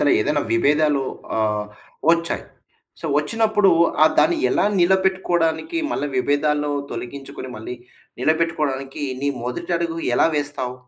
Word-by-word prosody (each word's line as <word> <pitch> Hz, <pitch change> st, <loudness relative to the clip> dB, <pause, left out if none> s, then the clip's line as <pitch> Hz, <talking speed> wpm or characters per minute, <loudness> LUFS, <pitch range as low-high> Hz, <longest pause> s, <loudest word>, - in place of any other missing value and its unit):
తన 145 Hz, -, +4 dB
ఏదైనా 150 Hz, 0 st, +1 dB
విభేదాలు 145 Hz, +4 st, +3 dB, 0.4 s
ఆహ్, 105 Hz, -1 st, 0 dB, 0.5 s
వచ్చాయి. 170 Hz, 0 st, 0 dB, 0.6 s
సో -, -, -6 dB
వచ్చినప్పుడు 210 Hz, +5 st, +2 dB, 0.3 s
ఆహ్, 155 Hz, -, +4 dB
దాన్ని 345 Hz, 0 st, +3 dB
ఎలా -, -, +2 dB
నిలబెట్టుకోడానికి 190 Hz, -, +1 dB
మళ్ళీ 145 Hz, -, -1 dB
విభేదాలను 145 Hz, +2 st, +1 dB, 0.2 s
తొలగించుకొని 135 Hz, 0 st, -7 dB
మళ్ళీ 110 Hz, +3 st, -6 dB, 0.5 s
నిలబెట్టుకోడానికి 150 Hz, -3 st, -1 dB, 0.2 s
నీ 140 Hz, -, 0 dB, 0.2 s
మొదటి 125 Hz, +8 st, -4 dB
అడుగు 165 Hz, -1 st, -3 dB, 0.2 s
ఎలా -, -, +4 dB
వేస్తావు? 145 Hz, -4 st, -2 dB
150 Hz, 115 wpm, -21 LUFS, 135-170 Hz, 0.6 s, తన